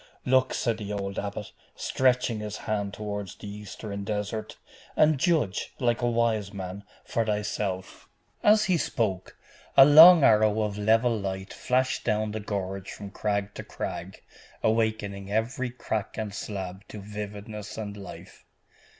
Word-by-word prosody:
'Look,' 130 0 +3
said 115 -2 0
the 105 -1 -5
old 100 -1 -3
abbot, 100 0 -5 0.2
stretching 125 -3 +1
his 105 -1 -5
hand 100 -2 -1
toward 105 -1 -5
the - - -8
Eastern 100 0 -7
desert, 105 +1 -4 0.4
'and 155 -2 +4
judge, 150 - 0
like 120 -2 +1
a 120 - +2
wise 115 -4 +1
man, 95 0 -6 0.2
for 115 - 0
thyself!' 105 -3 -3 0.3
As 215 +1 +5
he 185 -2 +2
spoke, 105 - -2 0.4
a 135 - +11
long 160 +3 +10
arrow 110 -2 +4
of 105 -1 -2
level 115 +3 +3
light 95 -2 -4
flashed 130 +1 0
down 110 -1 0
the 110 - -4
gorge 100 -2 -4
from 100 -1 -8
crag 100 0 -2
to - - -7
crag, 90 +3 -6 0.4
awakening 110 -3 0
every 120 +4 -1
crack 110 -4 -4
and 110 -2 -3
slab 95 -3 -5
to 105 - -8
vividness 105 +1 -7
and 105 -2 -5
life. 100 -2 -11
105 Hz, 145 wpm, -27 LUFS, 100-115 Hz, 0.4 s, a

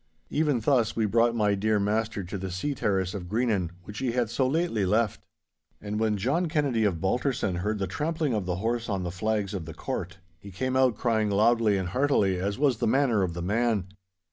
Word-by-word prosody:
Even 150 -5 +1
thus 120 -2 +2
we 110 - +1
brought 115 +3 +2
my 105 -3 +2
dear 105 +1 +1
master 105 0 -1
to 90 +3 -5
the 95 0 -4
sea 95 +11 -2
terrace 95 -7 0
of 95 -4 -6
Greenan 110 -5 0
which 105 +3 -8
he 130 -3 -1
had 120 -3 0
so 130 +1 +1
lately 155 - 0
left. 105 +3 0 0.5
And 105 +1 -4
when 110 -2 +1
John 140 - 0
Kennedy 140 -8 +1
of 90 -5 0
Balterson 100 - 0
heard 105 +4 -1
the 100 - -1
trampling 150 - -1
of 105 -4 -2
the 90 - 0
horse 115 +4 -2
on 95 -3 -1
the 90 - -3
flags 105 +1 -1
of 90 -5 -4
the 80 - -8
court, 95 +3 -4 0.2
he 100 - -11
came 130 +7 -2
out 130 -3 +3
crying 110 -3 +1
loudly 110 0 +3
and 95 -2 -2
heartily 105 -7 +2
as 100 +2 -2
was 140 -4 +2
the - - +1
manner 125 -3 +3
of 90 -3 -1
the 85 - -4
man. 105 -1 0
110 Hz, 215 wpm, -27 LUFS, 95-120 Hz, 0.5 s, out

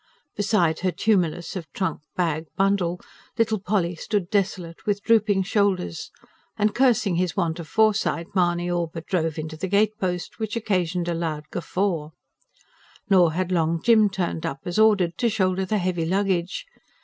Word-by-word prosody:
Beside 200 -6 +1
her 185 - +1
tumulus 175 -2 0
of 170 -4 -6
trunk, 190 -5 -2
bag, 165 -3 -1
bundle 195 -3 +1 0.4
little 220 -2 +1
Polly 185 -2 0
stood 185 +2 -2
desolate, 185 -4 -1
with 205 -1 0
drooping 210 -4 +3
shoulders; 195 - 0 0.5
and 210 0 +2
cursing 235 -8 +2
his 180 0 -1
want 170 -2 0
of 165 - -7
foresight, 215 -5 +2
Mahony 175 -2 +1
all 175 -1 0
but 165 0 -7
drove 165 -4 -1
into 155 0 -5
the 175 +5 -4
gatepost, 200 -2 0
which 220 0 -3
occasioned 180 -6 -1
a 175 - 0
loud 160 -3 -3
guffaw. 175 -4 -2 1.0
Nor 175 -4 +5
had 185 +2 -2
Long 165 -1 +1
Jim 220 0 +5
turned 180 -4 -3
up 135 - -4
as 175 +4 -2
ordered, 195 -6 +3
to 235 - +2
shoulder 190 -3 0
the 215 +3 0
heavy 180 -3 -1
luggage. 190 - 0
185 Hz, 160 wpm, -24 LUFS, 170-205 Hz, 1.0 s, Nor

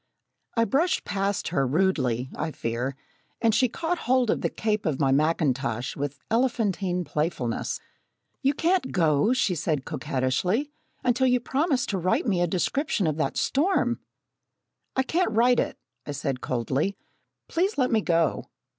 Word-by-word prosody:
I 230 - +4
brushed 315 +9 +1
past 200 0 -1
her, 135 -1 +1
rudely, 130 -6 +1
I 160 - -2
fear, 125 -1 -3 0.4
and 230 -1 +3
she 255 +2 +3
caught 335 +7 -2
hold 255 -3 +4
of - - -1
the - - +1
cape 215 -3 -1
of 145 -4 -1
my 135 -3 +3
mackintosh 135 -5 +1
with 145 0 -3
elephantine 205 -7 +1
playfulness. 150 -6 -2 0.6
"You 275 0 +2
can't 340 -2 +1
go," 160 +3 +3
she 255 -7 +2
said 150 -4 -1
coquettishly, 155 - -1 0.3
"until 250 +1 +3
you 250 0 +3
promise 270 +1 0
to 195 -5 -2
write 225 - +1
me 190 -7 +1
a 175 - +3
description 200 - 0
of 155 -1 0
that 160 - -1
storm!" 275 -6 +1 1.0
"I 265 - +3
can't 350 +7 +1
write 240 +3 +4
it," - - -1 0.3
I 145 - -3
said 135 -2 -3
coldly. 130 - -1 0.5
"Please 375 +5 0
let 255 -2 +2
me 220 -2 +3
go." 165 -5 +1
190 Hz, 155 wpm, -26 LUFS, -, 1.0 s, I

